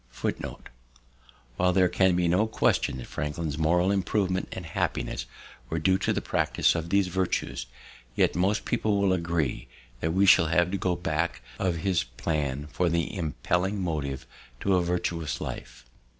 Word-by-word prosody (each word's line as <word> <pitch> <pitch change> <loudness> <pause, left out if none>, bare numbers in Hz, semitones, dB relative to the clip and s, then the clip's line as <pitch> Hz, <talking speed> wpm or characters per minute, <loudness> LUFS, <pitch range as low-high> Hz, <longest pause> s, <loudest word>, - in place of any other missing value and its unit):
While 90 0 +3
there 90 0 +5
can 95 0 +3
be 90 -1 +2
no 90 +6 +3
question 110 - +1
that 65 - -7
Franklin's 75 +1 -3
moral 90 +4 +3
improvement 95 -1 0
and 95 - -6
happiness 80 - -2 0.4
were 80 - -2
due 95 +4 +2
to - - +1
the - - -1
practice - - +2
of 85 0 -3
these 100 +1 +3
virtues, 90 -8 -2 0.5
yet - - +3
most 95 +4 +1
people 105 -2 +1
will 100 -2 +3
agree 85 -8 -1 0.3
that 80 - 0
we 95 +3 +3
shall 85 -3 +6
have 85 +2 +2
to 100 - 0
go 90 -1 +1
back 85 0 -2 0.2
of 95 -3 +1
his 95 -3 +2
plan 70 +3 -2
for 90 -1 +1
the 85 +4 -1
impelling 90 +3 -1
motive 75 -7 -2 0.4
to 100 - +2
a 90 - +4
virtuous 85 -2 -2
life. 60 0 -7
85 Hz, 160 wpm, -27 LUFS, 80-95 Hz, 0.5 s, shall